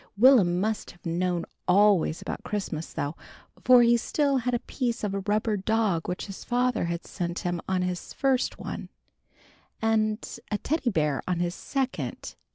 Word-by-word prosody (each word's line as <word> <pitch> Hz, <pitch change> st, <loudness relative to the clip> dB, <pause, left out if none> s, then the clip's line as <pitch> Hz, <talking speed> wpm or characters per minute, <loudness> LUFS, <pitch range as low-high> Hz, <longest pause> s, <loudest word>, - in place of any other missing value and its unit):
Will'm 205 Hz, -8 st, +6 dB
must 215 Hz, +2 st, -1 dB
have 175 Hz, -, -16 dB
known 175 Hz, +1 st, 0 dB, 0.2 s
always 190 Hz, -3 st, +4 dB
about -, -, -5 dB
Christmas 190 Hz, -6 st, -4 dB
though, 145 Hz, +3 st, -3 dB, 0.5 s
for 250 Hz, -1 st, +7 dB
he 235 Hz, 0 st, +5 dB
still 280 Hz, +4 st, +1 dB
had 250 Hz, 0 st, 0 dB
a 235 Hz, -, -4 dB
piece 245 Hz, -4 st, -2 dB
of 205 Hz, -2 st, -1 dB
a 200 Hz, -, -1 dB
rubber 210 Hz, +2 st, 0 dB
dog 200 Hz, -4 st, 0 dB
which 180 Hz, -, -3 dB
his 195 Hz, -2 st, -8 dB
father 245 Hz, -4 st, +1 dB
had 170 Hz, 0 st, -3 dB
sent 175 Hz, -1 st, -4 dB
him 175 Hz, -1 st, -1 dB
on 185 Hz, -1 st, +1 dB
his 180 Hz, -1 st, -4 dB
first 265 Hz, -2 st, +1 dB
one, -, -, -6 dB, 0.9 s
and 215 Hz, 0 st, 0 dB
a 210 Hz, -, 0 dB
Teddy 295 Hz, +1 st, 0 dB
Bear 150 Hz, -, 0 dB
on 180 Hz, -1 st, 0 dB
his 175 Hz, 0 st, 0 dB
second. 265 Hz, +5 st, -3 dB
205 Hz, 165 wpm, -27 LUFS, 175-240 Hz, 0.9 s, for